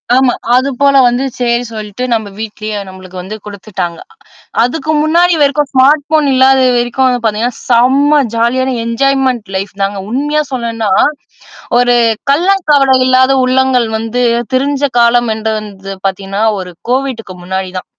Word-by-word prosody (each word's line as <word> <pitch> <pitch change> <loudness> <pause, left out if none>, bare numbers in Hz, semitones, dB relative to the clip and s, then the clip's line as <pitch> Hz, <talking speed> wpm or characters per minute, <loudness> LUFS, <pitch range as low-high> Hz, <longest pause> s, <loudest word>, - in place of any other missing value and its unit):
ஆமா. 260 -1 +3 0.2
அது 260 +2 +2
போல 280 0 +3
வந்து 245 +2 0 0.2
சரி 240 0 0
சொல்லிட்டு 215 +2 -6
நம்ம 220 -2 -1
வீட்லயே 215 -1 -5
நம்மளுக்கு 185 -1 -11
வந்து 200 +4 -7
குடுத்துட்டாங்க. 190 -4 -6 0.6
அதுக்கு 310 +5 -2
முன்னாடி 340 +3 +3
வரைக்கும் 285 0 +1
ஸ்மார்ட் 280 +3 +4
ஃபோன் 305 -2 +2
இல்லாத 265 +1 +4 0.2
வரைக்கும் 240 +2 +1
வந்து 245 -1 0
பார்த்தீங்கன்னா, 225 +3 -1
செம்ம 275 +5 +4
ஜாலியான 255 +3 0
என்ஜாய்மென்ண்ட் 255 -3 0
லைஃப் 195 0 -5
தாங்க. 195 0 -1
உண்மையா 295 +4 0
சொல்லும்ன்னா, 230 -2 -2 0.9
ஒரு 245 0 +3 0.4
கள்ளம் 365 +5 +1
கபட 275 -2 +4
இல்லாத 260 +1 +4
உள்ளங்கள் 255 -2 +2
வந்து 225 +3 -2 0.3
திரிஞ்ச 280 +2 0 0.2
காலம் 235 0 +3
என்று 220 0 -2
வந்தது 195 -2 -9
பார்த்தீங்கன்னா, 195 +2 -3 0.2
ஒரு 180 -1 -8 0.2
COVIDக்கு 250 -7 -2
முன்னாடி 190 0 -3
தான். - - -8
245 Hz, 140 wpm, -12 LUFS, 215-270 Hz, 0.9 s, ஸ்மார்ட்